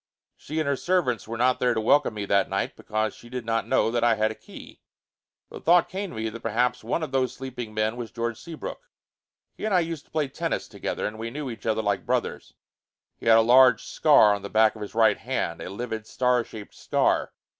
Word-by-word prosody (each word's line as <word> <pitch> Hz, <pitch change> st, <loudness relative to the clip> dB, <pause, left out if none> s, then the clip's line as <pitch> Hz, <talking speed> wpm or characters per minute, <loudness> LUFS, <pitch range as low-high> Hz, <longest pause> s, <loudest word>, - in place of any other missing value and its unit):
She 155 Hz, +2 st, -5 dB
and 155 Hz, -, -1 dB
her 140 Hz, -, +2 dB
servants 135 Hz, -, 0 dB
were 115 Hz, +1 st, -5 dB
not 125 Hz, +2 st, +2 dB
there 125 Hz, -1 st, +2 dB
to -, -, +1 dB
welcome 115 Hz, +1 st, +3 dB
me 105 Hz, -1 st, -3 dB
that 100 Hz, -1 st, +2 dB
night, -, -, -2 dB
because 110 Hz, -1 st, -2 dB
she 120 Hz, -, -15 dB
did 125 Hz, -2 st, -5 dB
not 115 Hz, 0 st, -1 dB
know 115 Hz, -, +2 dB
that 120 Hz, 0 st, 0 dB
I 120 Hz, -1 st, +4 dB
had 110 Hz, 0 st, +1 dB
a -, -, -5 dB
key. -, -, -13 dB, 0.7 s
The -, -, -8 dB
thought 175 Hz, +1 st, +4 dB
came 195 Hz, +1 st, -4 dB
to -, -, -10 dB
me 110 Hz, 0 st, -2 dB
that 115 Hz, +2 st, -8 dB
perhaps 120 Hz, +2 st, 0 dB
one 125 Hz, +8 st, -1 dB
of 155 Hz, -, -5 dB
those 130 Hz, -2 st, 0 dB
sleeping 125 Hz, -4 st, -6 dB
men 110 Hz, +2 st, 0 dB
was 120 Hz, -2 st, -5 dB
George 115 Hz, 0 st, -4 dB
Seabrook. 170 Hz, -, -8 dB, 0.6 s
He -, -, -12 dB
and 215 Hz, -3 st, +1 dB
I 180 Hz, -, +5 dB
used 165 Hz, -3 st, -5 dB
to -, -, -30 dB
play 155 Hz, -2 st, 0 dB
tennis 135 Hz, -, -3 dB
together -, -, -4 dB
and 110 Hz, +1 st, -5 dB
we 115 Hz, +1 st, -4 dB
knew 140 Hz, +1 st, -5 dB
each 115 Hz, -, -9 dB
other 110 Hz, 0 st, +1 dB
like 100 Hz, -2 st, 0 dB
brothers. -, -, -2 dB, 0.6 s
He -, -, -7 dB
had 115 Hz, 0 st, +7 dB
a -, -, +6 dB
large 125 Hz, +2 st, +6 dB
scar 105 Hz, -1 st, +5 dB
on 100 Hz, -, -3 dB
the 100 Hz, -, -7 dB
back 110 Hz, +1 st, +3 dB
of 110 Hz, -, -11 dB
his 105 Hz, +1 st, -7 dB
right 115 Hz, -1 st, +4 dB
hand; -, -, -3 dB
a -, -, -6 dB
livid 110 Hz, +1 st, -5 dB
star 125 Hz, -1 st, +1 dB
shaped 110 Hz, -2 st, -11 dB
scar. -, -, 0 dB
115 Hz, 235 wpm, -25 LUFS, 110-130 Hz, 0.7 s, had